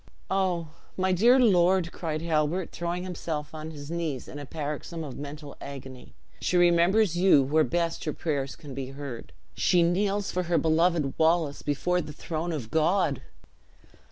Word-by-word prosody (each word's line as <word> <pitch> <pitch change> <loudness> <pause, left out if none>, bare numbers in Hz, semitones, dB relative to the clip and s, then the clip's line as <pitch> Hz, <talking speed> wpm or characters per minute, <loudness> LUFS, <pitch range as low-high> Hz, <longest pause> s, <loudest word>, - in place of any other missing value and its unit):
"Oh, 180 -4 0 0.3
my 190 0 +1
dear 235 +8 +5
lord!" 185 -6 +4
cried 160 -2 -4
Halbert, 165 +2 0
throwing 175 +1 -3
himself 160 -4 -4
on 155 0 -6
his 145 -1 -8
knees 165 -7 -3
in 145 - -8
a 145 - -8
paroxysm 155 +3 -5
of 140 -4 -7
mental 145 0 -8
agony, 130 - -9 0.2
"she 180 - +1
remembers 175 +3 +4
you 175 -6 +6
where 155 +4 +3
best 170 +1 -1
her 155 - -1
prayers 140 -4 -2
can 145 -3 -10
be 135 0 -4
heard. 135 -3 -7 0.2
She 175 -1 +3
kneels 195 +3 +1
for 180 - 0
her 170 - +3
beloved 160 -3 +2
Wallace, 160 -3 +2
before 180 +5 0
the 150 -2 -8
throne 165 +3 -4
of 130 -9 -5
God!" 160 -3 +2
165 Hz, 160 wpm, -27 LUFS, 145-175 Hz, 0.3 s, you